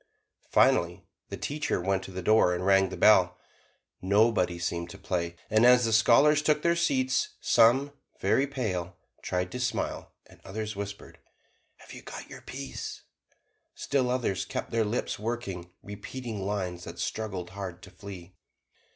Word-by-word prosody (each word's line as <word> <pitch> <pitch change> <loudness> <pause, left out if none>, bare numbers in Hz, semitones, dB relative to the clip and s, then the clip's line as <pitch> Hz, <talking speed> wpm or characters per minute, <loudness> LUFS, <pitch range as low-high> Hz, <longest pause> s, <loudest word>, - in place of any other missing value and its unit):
Finally, - - +3 0.2
the - - -5
teacher 150 -7 -2
went 95 +1 0
to 95 - -9
the 95 0 -6
door 110 -5 +4
and 90 +1 -3
rang 95 -1 +4
the - - -7
bell: 90 -4 +5 0.6
nobody 100 -2 +2
seemed 85 0 -3
to 100 - -10
play, 85 -3 -3
and 110 +1 +3
as 125 0 +6
the 115 - 0
scholars 140 +7 +5
took 150 0 +1
their 170 0 +3
seats, 130 -6 +1
some, 130 +5 +4 0.3
very 140 - +2
pale, 95 -10 -3 0.2
tried 90 0 -2
to 125 - -5
smile, 125 - -2
and - - -19
others 110 +2 -5
whispered, 100 0 -7 0.6
"Have - - -14
you - - -9
got - - -9
your - - -9
piece?" 65 -1 -7 0.7
Still 135 -3 0
others 125 -7 0
kept - - -5
their 115 -1 +2
lips 105 0 -2
working, 105 -6 -4
repeating 105 0 -6
lines 90 -4 -3
that 85 +1 -8
struggled 95 -5 -4
hard 95 -2 -7
to 95 - -12
flee. 90 -1 -10
100 Hz, 155 wpm, -28 LUFS, 90-120 Hz, 0.7 s, as